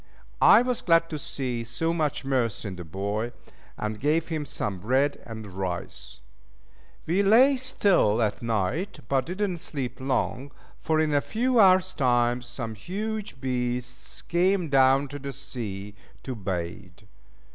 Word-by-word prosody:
I 235 - +8
was 250 -1 -1
glad 165 -1 +3
to 155 - -3
see 125 -4 -3
so 165 +8 -1
much 155 -4 -1
mirth 125 -6 0
in 100 -2 -4
the 90 - -7
boy, 100 +7 -3 0.4
and 105 0 -3
gave 155 +5 +1
him 155 -3 -3
some 105 -9 -3
bread 130 +8 +1
and 110 -2 -7
rice. 90 -9 -6 0.8
We 180 +5 +2
lay 240 +8 +6
still 200 - +2
at 105 -3 0
night, 115 - -1
but 135 0 +1
did 195 +4 -1
not 180 -3 -4
sleep 140 -6 -5
long, 130 0 -1 0.3
for 155 0 +1
in 155 -1 +1
a 145 - +3
few 245 - +1
hours' 185 -2 +5
time 120 -3 +2
some 120 -2 -6
huge 205 - -5
beasts 125 -1 -4
came 180 0 +1
down 135 +1 +4
to 145 +1 -7
the 140 0 -5
sea 105 -7 -6 0.3
to 130 - -4
bathe. 95 -2 -5
135 Hz, 150 wpm, -26 LUFS, 110-170 Hz, 0.8 s, I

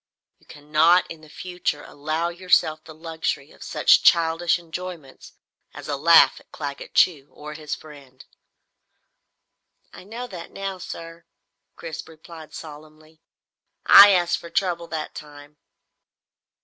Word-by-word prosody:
You - - -29
cannot 155 +4 +2
in 165 -1 -10
the 155 - -16
future 180 -4 -4
allow 155 +4 -3
yourself 175 -3 +1
the 160 - -13
luxury 160 -3 -4
of - - -20
such - - +3
childish 165 +1 +3
enjoyments 170 -4 -9 0.4
as - - -9
a 145 - -2
laugh 165 +4 +5
at - - -25
Claggett 140 -2 -8
Chew, 150 -6 +2
or 150 +1 -10
his 150 -1 -5
friend!" 140 -4 -15 1.7
"I - - -12
know 230 +5 -7
that 180 -8 -10
now 195 -1 -6
sir," 165 -1 -9 0.5
Chris 165 -2 -7
replied 160 0 -13
solemnly. 155 +1 -13 0.6
"I 200 +1 +10
asked 175 -3 +2
for 170 - -11
trouble 170 -2 -2
that 155 -1 -5
time." 145 0 -13
160 Hz, 130 wpm, -23 LUFS, 150-175 Hz, 1.7 s, I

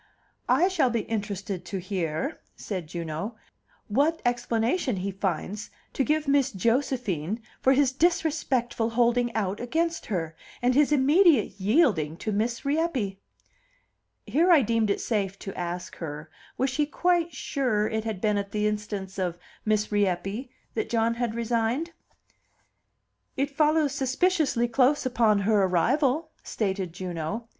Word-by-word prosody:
"I 360 - +5
shall 350 -9 +2
be 235 -2 0
interested 200 -4 -4
to 195 - -4
hear," 180 - -3
said 185 -6 -5
Juno, 170 +6 -4 0.5
"what 290 +9 +2
explanation 245 - 0
he 195 +1 -3
finds 195 +2 -3 0.2
to 270 - +1
give 305 +1 0
Miss 275 -1 +3
Josephine 225 - 0 0.2
for 265 - +5
his 275 -1 +3
disrespectful 280 -7 +1
holding 240 +1 +2
out 205 -2 -1
against 325 +7 -1
her, 165 -5 -3 0.2
and 245 +1 +2
his 290 +2 +4
immediate 290 - +4
yielding 195 - +2
to 215 - -3
Miss 230 +5 -1
Rieppe." 275 - 0 1.1
Here 340 +5 +3
I 310 -6 +7
deemed 225 -1 +1
it 200 - +1
safe 195 -4 -1
to 195 - -7
ask 175 0 -4
her, 155 -1 -7 0.3
was 265 +1 +1
she 295 +2 0
quite 345 +1 +1
sure 250 -6 0
it 220 0 -2
had 220 -4 -4
been 210 -1 +2
at 200 0 -5
the 210 0 0
instance 205 -2 -3
of 175 -2 -1 0.3
Miss 215 0 +1
Rieppe 205 +4 0 0.2
that 435 - -2
John 230 0 +2
had 235 -1 -2
resigned? 235 +7 0 1.5
"It 275 +1 -1
follows 305 -1 +3
suspiciously 275 -2 +1
close 260 +4 +2
upon 225 -5 +3
her 210 0 +3
arrival," 270 - +1
stated 190 -4 -2
Juno. 180 +6 -5
230 Hz, 140 wpm, -26 LUFS, 195-275 Hz, 1.5 s, I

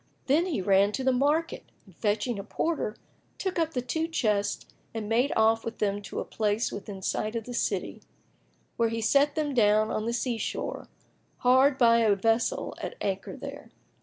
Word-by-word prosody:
Then 310 +7 +3
he 305 - -1
ran 200 +2 +4
to 265 - -2
the 260 - +3
market 295 +6 +1 0.2
and 190 -5 -19
fetching 215 +2 -1
a - - -5
porter, 260 0 -2 0.4
took 375 -2 -2
up 325 -2 -1
the 250 - -1
two 320 +6 -1
chests 210 -11 0 0.3
and 220 -2 -3
made 240 +6 +2
off 225 0 +3
with 230 - -5
them 205 -1 0
to 195 - -6
a - - -3
place 215 +1 -1
within 200 -1 -7
sight 215 +4 -1
of 230 - -2
the 245 - -8
city, 190 - -2 0.8
where 230 -1 +2
he 230 0 -3
set 280 +6 +3
them 300 -3 -1
down 215 -2 +3
on 215 +1 -2
the - - 0
sea 240 -1 -1
shore, - - -4 0.5
hard 260 +2 +4
by 235 -2 +5
a 215 -3 +4
vessel 225 +4 0
at - - -5
anchor 195 -1 -3
there. - - -8
225 Hz, 190 wpm, -28 LUFS, 210-265 Hz, 0.8 s, by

